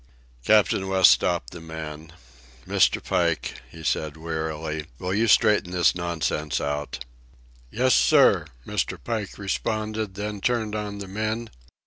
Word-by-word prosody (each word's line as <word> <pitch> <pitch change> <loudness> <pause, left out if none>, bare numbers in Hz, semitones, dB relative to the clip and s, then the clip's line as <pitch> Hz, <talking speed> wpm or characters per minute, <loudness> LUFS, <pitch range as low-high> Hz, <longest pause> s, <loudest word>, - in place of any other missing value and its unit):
Captain 100 - +3
West 95 -1 +6
stopped - - +1
the 85 - -9
man. 80 -1 -8 0.6
"Mr. - - +2
Pike," - - -1
he 80 +5 -12
said 75 0 -1
wearily, 80 -1 -4
"will 90 +5 -3
you 110 +3 +2
straighten 105 -3 +4
this 90 -2 +3
nonsense 85 -3 -2
out." 70 -3 -4 0.6
"Yes, 130 - +2
sir," 130 - +5 0.2
Mr. - - -2
Pike 110 -4 -4
responded, 110 0 -2
then 105 0 -4
turned 115 -3 0
on 105 -1 -4
the 100 -1 -7
men. 110 +3 -3
95 Hz, 130 wpm, -25 LUFS, 80-110 Hz, 0.6 s, West